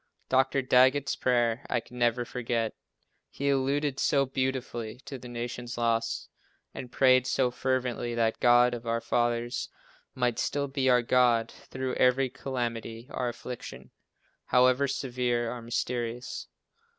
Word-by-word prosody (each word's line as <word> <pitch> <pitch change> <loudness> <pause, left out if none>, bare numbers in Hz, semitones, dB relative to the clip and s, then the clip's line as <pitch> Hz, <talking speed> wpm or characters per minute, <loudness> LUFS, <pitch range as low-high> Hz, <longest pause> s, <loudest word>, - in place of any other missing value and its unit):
Dr. 135 +1 +2
Daggett's 130 +2 +4
prayer, 120 0 +1
I 120 - +1
can 125 +2 -12
never 120 0 +2
forget, 115 -2 -2 0.6
he 140 0 -1
alluded 140 +1 0
so 140 -1 +3
beautifully 130 -4 -3
to 135 -1 -7
the 125 - -10
nation's 120 0 -5
loss, 115 -1 0 0.5
and 125 - -8
prayed 130 -1 +4
so 130 -2 +1
fervently 125 -2 -1
that 115 -1 +2
the - - -31
God 120 0 +5
of 120 -1 -6
our 115 0 +1
fathers 120 +1 -1 0.5
might 125 -2 0
still 140 0 -1
be 135 -1 0
our 125 -1 +4
God, 120 -2 +3
through 130 -1 -5
every 130 0 +3
calamity 120 -2 -4
or 125 -2 -1
affliction, 120 - -8 0.5
however 130 +2 +4
severe 125 -3 -1
or 120 - -7
mysterious. 120 +1 -3
125 Hz, 140 wpm, -28 LUFS, 120-130 Hz, 0.6 s, God